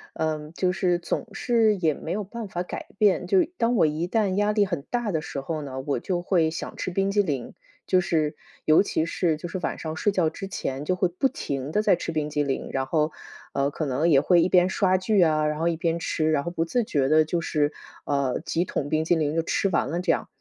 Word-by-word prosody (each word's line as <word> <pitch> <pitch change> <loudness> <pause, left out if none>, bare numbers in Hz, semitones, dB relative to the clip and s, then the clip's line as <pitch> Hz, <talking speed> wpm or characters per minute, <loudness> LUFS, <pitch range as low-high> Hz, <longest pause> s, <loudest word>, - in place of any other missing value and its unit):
嗯， 155 -1 -2
就 180 +1 +1
是 180 -2 +1
总 180 - -3
是 225 0 +2
也 165 -4 +2
没 160 - -6
有 205 +3 -1
办 225 +2 -7
法 175 - -3
改 - - -7
变， 205 -3 +3
就 375 -2 +4
当 235 +1 +2
我 175 -7 +4
一 155 +3 -1
旦 200 -1 +1
压 205 +1 +2
力 210 -1 +3
很 175 -6 -3
大 240 -3 -1
的 160 -3 -1
时 145 -3 -5
候 155 +3 -4
呢， 135 -2 -6
我 135 -2 -1
就 175 +6 -2
会 170 -3 +2
想 160 - -6
吃 185 - -4
冰 195 +2 +1
激 205 +1 +3
凌， 140 -9 -3 0.3
就 185 - +4
是 155 -4 0 0.3
尤 155 +5 +6
其 160 -5 -1
是 170 -1 0
就 165 - -6
是 185 - -4
晚 - - -3
上 160 -1 -4
睡 205 - +1
觉 180 -5 +2
之 195 +5 -7
前 135 -6 -4
就 180 +5 0
会 185 - +2
不 180 +10 0
停 140 - -4
地 210 - +2
在 215 - +4
吃 - - -4
冰 155 -1 -1
激 150 0 0
凌， 140 -2 -3
然 135 -1 0
后， 155 +2 0 0.4
呃， 140 0 +1
可 155 - -3
能 140 +5 +1
也 140 -4 +6
会 170 +4 +4
一 175 - +2
边 180 -1 +5
刷 185 0 +2
剧 190 +2 +2
啊， 155 -2 +3
然 150 0 -1
后 170 +1 +2
一 165 - -1
边 165 0 0
吃， 155 -1 0
然 145 -2 +1
后 170 - -4
不 165 -1 -1
自 240 +8 0
觉 140 -10 0
地 155 +2 +5
就 165 +3 -1
是， 150 -2 0 0.3
呃， 140 -2 0
几 170 +1 -1
桶 145 -5 -3
冰 155 +1 +1
淇 175 - +3
淋 155 -2 0
就 165 - +2
吃 195 +4 0
完 170 - +1
了 170 +4 -2
这 180 - +2
样。 - - -1
165 Hz, 275 characters per minute, -25 LUFS, 150-185 Hz, 0.4 s, 尤